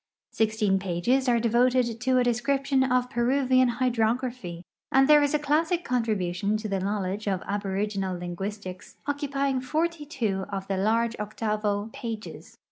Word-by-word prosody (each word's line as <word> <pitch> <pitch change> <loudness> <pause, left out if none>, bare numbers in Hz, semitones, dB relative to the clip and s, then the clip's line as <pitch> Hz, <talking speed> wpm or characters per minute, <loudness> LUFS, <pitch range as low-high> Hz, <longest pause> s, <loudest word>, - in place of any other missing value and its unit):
Sixteen 215 -3 +1
pages 195 +9 +1
are 235 -1 +3
devoted 240 0 +2
to 255 0 +2
a 250 - +4
description 265 +3 +1
of 250 -1 +1
Peruvian 255 0 +3
hyilrography, 235 -6 -1 0.3
and 270 0 +5
there 300 0 +7
is 290 +1 +2
a - - +5
classic 320 +4 +1
contrihntiou 210 -4 0
to 215 0 -5
the 195 -2 -1
knowledge 200 +1 -2
of 190 -2 -1
aboriginal 200 -1 -2
linguistic;s 185 +2 -6
occu|tying 280 -2 -1
forty 310 +3 -1
two 210 -10 -2
of 195 -1 -4
the 195 - -1
largo 225 +3 +1
octavo 210 0 -2
pages. 225 -2 -7
230 Hz, 140 wpm, -26 LUFS, 200-260 Hz, 0.3 s, there